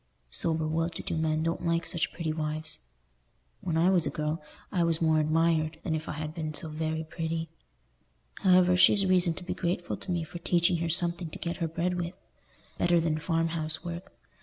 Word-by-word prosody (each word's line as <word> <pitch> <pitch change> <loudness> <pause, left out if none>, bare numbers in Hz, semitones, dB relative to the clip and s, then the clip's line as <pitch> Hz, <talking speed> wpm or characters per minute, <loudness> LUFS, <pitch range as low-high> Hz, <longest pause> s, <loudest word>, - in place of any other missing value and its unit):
Sober 160 - +1
well 165 +2 0
to - - -7
do - - -3
men 160 0 +1
don't 165 0 -1
like 170 0 +1
such 170 -2 0
pretty 160 -3 -3
wives. 155 - -1 0.8
When 165 -2 -1
I 175 +3 +4
was 175 -5 +3
a - - +1
girl, 155 +1 -2 0.3
I 180 -4 +2
was 165 -1 +1
more 160 -1 +3
admired 155 0 +2
than 165 - -1
if 155 0 -3
I - - -2
had 155 0 -5
been 155 -2 -4
so 160 -1 -2
very 160 +1 -2
pretty. 160 0 -3 0.9
However, 180 -1 +5
she's 195 +2 +6
reason 180 -3 +3
to 185 - -8
be 180 - -3
grateful 175 0 -2
to 190 - -4
me 170 -2 0
for 170 +2 -8
teaching 175 +1 +2
her 165 0 -1
something 170 0 +2
to - - -8
get 170 0 -3
her 165 - -1
bread 170 +3 -1
with, 175 +2 -5 0.6
better 175 -1 +4
than 160 -2 0
farm 165 +1 0
house 160 0 -2
work. 175 +3 -6
165 Hz, 205 wpm, -29 LUFS, 155-175 Hz, 0.9 s, she's